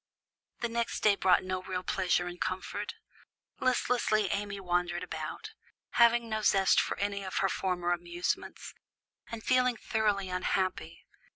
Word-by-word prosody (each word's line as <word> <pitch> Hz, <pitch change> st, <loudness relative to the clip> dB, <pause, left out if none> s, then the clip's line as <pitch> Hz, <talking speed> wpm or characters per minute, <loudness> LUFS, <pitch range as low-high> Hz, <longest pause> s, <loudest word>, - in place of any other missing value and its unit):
The 240 Hz, -, +1 dB
next 235 Hz, 0 st, -2 dB
day 210 Hz, -2 st, +5 dB
brought 185 Hz, -2 st, +3 dB
no 185 Hz, 0 st, -3 dB
real 185 Hz, 0 st, -4 dB
pleasure 180 Hz, -2 st, +1 dB
and 175 Hz, 0 st, -7 dB
comfort. 185 Hz, 0 st, -3 dB, 0.6 s
Listlessly 240 Hz, -5 st, +1 dB
Amy 205 Hz, 0 st, -2 dB
wandered 180 Hz, -2 st, -1 dB
about, -, -, -6 dB, 0.4 s
having 235 Hz, 0 st, +4 dB
no 215 Hz, -1 st, -2 dB
zest 195 Hz, -2 st, +4 dB
for -, -, -3 dB
any 200 Hz, 0 st, -2 dB
of 190 Hz, -, -4 dB
her 195 Hz, -, +2 dB
former 180 Hz, -2 st, -1 dB
amusements, 175 Hz, 0 st, -3 dB, 0.5 s
and 225 Hz, -1 st, -7 dB
feeling 250 Hz, -2 st, +3 dB
thoroughly 210 Hz, -4 st, 0 dB
unhappy. 180 Hz, -2 st, -2 dB
195 Hz, 135 wpm, -30 LUFS, 180-220 Hz, 0.6 s, day